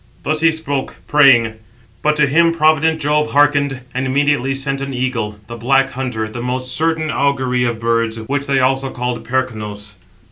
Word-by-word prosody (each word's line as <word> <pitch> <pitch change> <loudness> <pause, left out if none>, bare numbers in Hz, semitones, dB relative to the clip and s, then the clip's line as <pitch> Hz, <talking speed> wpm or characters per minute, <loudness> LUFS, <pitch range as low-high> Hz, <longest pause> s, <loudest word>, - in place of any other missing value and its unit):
Thus 155 0 -1
he 165 - +5
spoke, 145 -4 -3
praying; 120 -7 +4 0.4
but 150 0 +2
to 150 -1 +3
him 165 +4 +3
provident 160 0 +2
Jove 150 +1 0
hearkened, 145 -2 +2
and 130 +1 -2
immediately 135 -1 +1
sent 135 0 -3
an 135 -1 -4
eagle, 125 -5 -2
the 120 +3 -8
Black 135 +3 +2
Hunter, 125 -4 -3
the 115 +2 -7
most 125 +1 -3
certain 160 +1 0
augury 130 -3 0
of 120 -2 -2
birds, 115 -1 0
which 140 +5 -3
they 135 -1 +2
also 135 +1 +1
call 125 -1 -3
Percnos. 110 -6 -4
135 Hz, 170 wpm, -17 LUFS, 125-145 Hz, 0.4 s, he